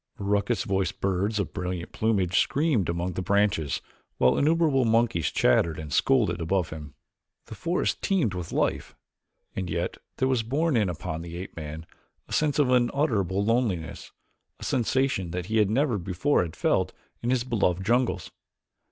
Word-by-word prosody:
Raucous 100 +2 0
voiced 95 -1 -1
birds 100 +3 0
of 100 - -2
brilliant 90 -2 -4
plumage 100 -5 +1
screamed 140 - +1
among 85 +2 -2
the 95 - -3
branches 100 -7 +1 0.4
while 65 - +4
innumerable 155 -3 +3
monkeys 115 -8 +2
chattered 80 +5 +2
and 75 -2 -6
scolded 105 -11 +2
above 90 +1 0
him. 75 -2 -8 0.5
The - - -9
forest 170 +10 -1
teemed 170 - +1
with 90 -2 -5
life, - - -1 0.6
and 95 -2 -3
yet 85 +2 -2 0.2
there 130 - +1
was 130 -3 +2
borne 140 +7 0
in 105 -5 +2
upon 85 -1 -4
the 85 0 -7
ape 95 +2 -8
man 80 0 -7 0.4
a - - -8
sense 150 -2 +1
of 140 -4 +3
unutterable 120 - +1
loneliness, 105 -8 -1 0.5
a - - -10
sensation 130 -6 0
that 90 +1 -4
he 110 +2 +3
never 120 +1 +1
before 95 - +1
had 85 -3 -4
felt - - +1 0.3
in 120 - -2
his 125 -2 +2
beloved 100 -7 0
jungles. 120 -6 +1
100 Hz, 160 wpm, -26 LUFS, 85-125 Hz, 0.6 s, while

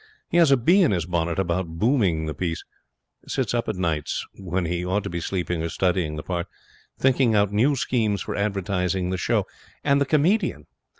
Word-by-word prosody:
He 170 - +2
has 170 -4 +6
a 135 - +5
bee 170 +12 +4
in 170 - +4
his 90 -5 0
bonnet 85 -1 -1
about 85 -3 -1
booming 100 - +2
the 80 - -3
piece. 85 -1 -3 0.6
Sits - - -1
up 120 -2 -1
at 110 - -1
nights, 80 -5 -2
when 90 -2 -3
he 85 +1 -2
ought 95 +3 0
to - - -5
be 85 - -2
sleeping 90 -2 -2
or 85 - -2
studying 85 -2 0
his 75 - -5
part, 90 0 -2 0.5
thinking 130 -3 +3
out 100 -1 +3
new 130 +8 +3
schemes 110 -6 0
for - - -4
advertising 95 -3 -1
the 95 - -1
show. - - +1 0.4
And 140 -1 +3
the 140 - +2
comedian. 165 +9 +1
95 Hz, 195 wpm, -24 LUFS, 85-120 Hz, 0.6 s, has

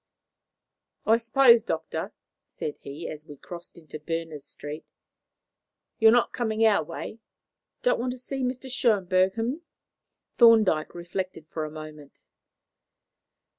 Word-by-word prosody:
"I 225 +1 +5
suppose, 235 +1 +6
Doctor," - - -4 0.4
said 150 - -6
he, 145 +4 -7
as 155 -1 -7
we 145 - -10
crossed 175 +4 -9
into 155 -2 -10
Berners 160 -2 -4
Street, 145 +2 -7 1.2
"you 225 - +6
are - - +9
not 240 +1 +3
coming 225 -2 +1
our 210 -6 +4
way! 170 +7 -7 0.6
Don't - - +3
want 250 +1 -1
to - - -9
see 265 +2 -5
Mr. 255 +1 -2
Schönberg, 195 -7 +2
h'm?" 240 +8 -2 0.8
Thorndyke 220 -11 +5
reflected 175 -1 -5
for 155 -2 -3
a - - -6
moment. 155 -2 -11
190 Hz, 130 wpm, -26 LUFS, 155-235 Hz, 1.2 s, are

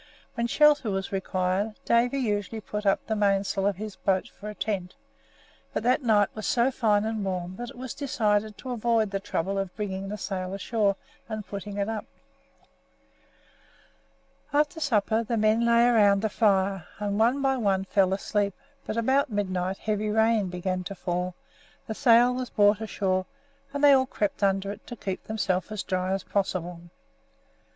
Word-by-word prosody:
When 235 -1 -1
shelter 295 -2 +4
was 195 -1 -2
required, 190 +2 -1
Davy 240 +3 +3
usually 215 -3 -1
put 210 0 -4
up 195 - +2
the 220 - -1
mainsail 195 -1 +1
of 200 - +1
his 210 +1 -7
boat 190 -1 0
for 210 - -9
a 210 - -8
tent; 190 -5 -3 0.8
but - - -1
that 255 +4 +3
night 215 -5 +3
was 215 - -5
so 245 +2 +2
fine 215 -5 +2
and 220 -2 -2
warm 185 -1 -3
that 240 0 -5
it - - -12
was 255 0 -6
decided 215 -6 0
to 260 - -7
avoid 230 -3 +1
the 195 - -1
trouble 195 0 -2
of 195 -2 -4
bringing 195 -2 -4
the 210 - -4
sail 185 -2 -4
ashore 200 0 0 0.3
and 215 -1 -4
putting 200 +1 -6
it 200 0 0
up. 220 -1 -4 2.4
After 300 +2 +1
supper 225 -5 +1
the 230 +1 -2
men 215 +2 +3
lay 235 0 +5
around 205 -4 +4
the 220 - +1
fire, 195 -4 +1
and 205 0 -2
one 240 +5 +3
by 270 -1 +2
one 195 -5 +1
fell 195 -1 +2
asleep; 200 0 -1 0.3
but 220 - -3
about 265 +5 +2
midnight 190 -3 -1
heavy 215 0 -1
rain 220 -2 +2
began 185 +1 -2
to 200 - -5
fall, 180 0 -3 0.5
the 220 - -4
sail 245 -1 +5
was 250 -1 -4
brought 205 +1 +3
ashore, 185 -4 -1 0.4
and 285 +1 -4
they 290 - +8
all 260 -1 +4
crept 205 -5 -2
under 195 0 +1
it 210 +2 -11
to 240 - -6
keep 190 -4 -5
themselves 195 -3 -1
as 215 -2 -3
dry 185 0 -1
as 195 0 -1
possible. 180 -3 -2
210 Hz, 175 wpm, -27 LUFS, 195-230 Hz, 2.4 s, they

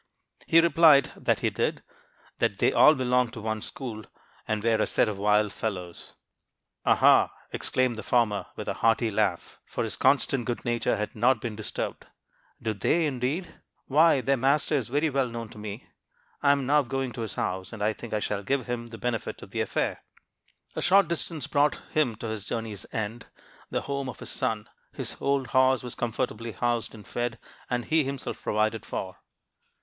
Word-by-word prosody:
He 165 - +6
replied 165 -4 +6
that - - 0
he - - +1
did; - - -1 0.6
that - - +1
they - - +3
all 155 - +7
belonged 125 -2 +1
to 120 - -7
one 110 0 -2
school, 110 -3 -6 0.4
and 110 -1 -1
were 115 -1 +3
a - - +2
set - - +2
of 105 -2 -3
wild 105 0 +3
fellows. 90 -6 -5 0.7
"'Aha!' - - +5 0.2
exclaimed 130 -3 0
the - - -4
former, 110 -4 +1
with - - -6
a - - 0
hearty 115 0 +3
laugh, 100 -4 -1
for - - -3
his 110 - -2
constant 135 -2 +2
good 120 +1 -3
nature 120 -1 +1
had 105 0 -3
not 120 +2 +3
been 110 -1 -4
disturbed, 110 0 -5 0.5
'do 110 - -2
they, 160 - +1
indeed? 140 +6 -3 0.2
Why, 150 0 +4
their 135 +2 +2
master 140 +5 +2
is 135 -7 +1
very 145 +4 +1
well 135 -1 +1
known 115 -1 -6
to 105 - -12
me. 105 +2 -7 0.6
I 140 - +5
am 140 -2 +1
now 150 +3 +4
going 135 -1 -3
to 115 - -6
his 110 -4 -4
house, 95 0 -3
and 110 -2 -5
I 110 +1 +2
think 115 +2 -9
I 110 - 0
shall 105 -1 -2
give 130 +6 -1
him 120 -1 -4
the 115 -1 -9
benefit 120 -1 -3
of - - -12
the - - -1
affair.' - - -1 0.7
"A - - -2
short 190 -1 +5
distance 165 -2 -3
brought 145 0 +2
him 145 -8 +1
to 115 +1 -6
his 110 -2 -4
journey's 110 -4 -4
end, 110 +2 -4 0.4
the - - -1
home 140 -1 -3
of 120 - -7
his - - -6
son. 110 -5 -2 0.3
His - - -3
old 140 -1 +1
horse 130 0 +3
was 125 - -5
comfortably 115 -1 -3
housed 120 +2 -1
and 105 - -13
fed, 120 -1 -2 0.3
and 120 -1 -1
he 160 +3 +3
himself 135 0 -5
provided 110 +1 0
for. 95 -1 -5
120 Hz, 190 wpm, -27 LUFS, 110-135 Hz, 0.7 s, all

